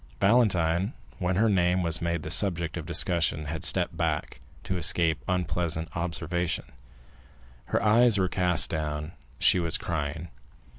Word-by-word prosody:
Valentine, 95 Hz, -, +2 dB, 0.3 s
when 90 Hz, 0 st, 0 dB
her 110 Hz, +4 st, +3 dB
name 90 Hz, -2 st, +2 dB
was 85 Hz, 0 st, +1 dB
made 85 Hz, -2 st, -2 dB
the 80 Hz, -, -6 dB
subject 85 Hz, -5 st, -1 dB
of 80 Hz, -3 st, -6 dB
discussion, 85 Hz, -2 st, +1 dB
had 80 Hz, +1 st, -5 dB
stepped -, -, +1 dB
back, -, -, -2 dB, 0.2 s
to 95 Hz, +1 st, -3 dB
escape 85 Hz, -1 st, +3 dB
unpleasant 85 Hz, -2 st, -2 dB
observation; 85 Hz, 0 st, -2 dB, 1.0 s
her -, -, -1 dB
eyes 115 Hz, +1 st, +4 dB
were 95 Hz, -1 st, +2 dB
cast 90 Hz, -3 st, +2 dB
down, 75 Hz, -1 st, -2 dB
and 75 Hz, -, -8 dB, 0.3 s
she 90 Hz, -, +4 dB
was 85 Hz, -1 st, -1 dB
crying. 80 Hz, -4 st, -4 dB
85 Hz, 145 wpm, -27 LUFS, 80-95 Hz, 1.0 s, eyes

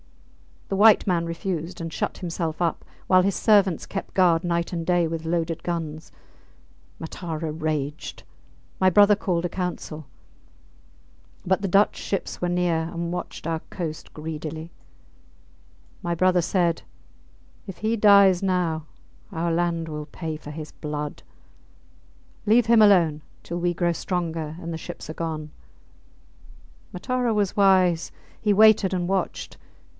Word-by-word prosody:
The 195 Hz, -, -1 dB
white 215 Hz, +1 st, +6 dB
man 175 Hz, -3 st, +1 dB
refused 170 Hz, 0 st, -4 dB
and 165 Hz, -1 st, -5 dB
shut -, -, -3 dB
himself 170 Hz, -2 st, -3 dB
up, 170 Hz, -2 st, -1 dB, 0.2 s
while 185 Hz, -1 st, +6 dB
his 195 Hz, 0 st, 0 dB
servants 200 Hz, -6 st, +3 dB
kept 195 Hz, -, -6 dB
guard 175 Hz, -3 st, +4 dB
night 170 Hz, -1 st, -1 dB
and 170 Hz, -2 st, -3 dB
day 175 Hz, -1 st, +2 dB
with 165 Hz, 0 st, -4 dB
loaded 165 Hz, 0 st, -1 dB
guns. 160 Hz, -2 st, -4 dB, 0.9 s
Matara 160 Hz, -1 st, -5 dB
raged. 155 Hz, -1 st, -4 dB, 0.6 s
My 185 Hz, -, +5 dB
brother 205 Hz, +3 st, +6 dB
called 180 Hz, -4 st, -1 dB
a 175 Hz, -, -1 dB
council. 170 Hz, -4 st, -5 dB, 1.4 s
But 190 Hz, +2 st, +1 dB
the 200 Hz, -, -1 dB
Dutch 195 Hz, +3 st, +3 dB
ships 195 Hz, -, -4 dB
were 175 Hz, -, 0 dB
near, 175 Hz, -2 st, 0 dB
and 170 Hz, 0 st, -3 dB
watched 180 Hz, -, -6 dB
our 165 Hz, 0 st, -1 dB
coast 160 Hz, -4 st, -6 dB
greedily. 155 Hz, +1 st, -6 dB, 1.3 s
My 170 Hz, 0 st, -2 dB
brother 185 Hz, +1 st, +3 dB
said, 170 Hz, -1 st, 0 dB, 0.8 s
If 195 Hz, -, -8 dB
he 220 Hz, +2 st, 0 dB
dies 200 Hz, -3 st, +6 dB
now 175 Hz, -5 st, 0 dB, 0.4 s
our 170 Hz, -1 st, -1 dB
land 170 Hz, -1 st, 0 dB
will 150 Hz, -1 st, -5 dB
pay 160 Hz, 0 st, -5 dB
for 150 Hz, -1 st, -10 dB
his 155 Hz, 0 st, -8 dB
blood. 150 Hz, -1 st, -5 dB, 1.2 s
Leave 225 Hz, +2 st, +4 dB
him 230 Hz, -1 st, +6 dB
alone 170 Hz, -7 st, +5 dB, 0.2 s
till 175 Hz, -, -4 dB
we 175 Hz, 0 st, 0 dB
grow 175 Hz, 0 st, +1 dB
stronger 165 Hz, -3 st, -3 dB
and 170 Hz, -1 st, -5 dB
the -, -, -3 dB
ships -, -, -8 dB
are -, -, -4 dB
gone. 155 Hz, -2 st, -4 dB, 1.4 s
Matara 250 Hz, +4 st, -1 dB
was 205 Hz, -2 st, 0 dB
wise; 185 Hz, -4 st, +4 dB, 0.3 s
he 210 Hz, -1 st, +3 dB
waited 215 Hz, -2 st, +5 dB
and 175 Hz, -1 st, -1 dB
watched. 195 Hz, 0 st, -2 dB
170 Hz, 140 wpm, -24 LUFS, 160-190 Hz, 1.4 s, white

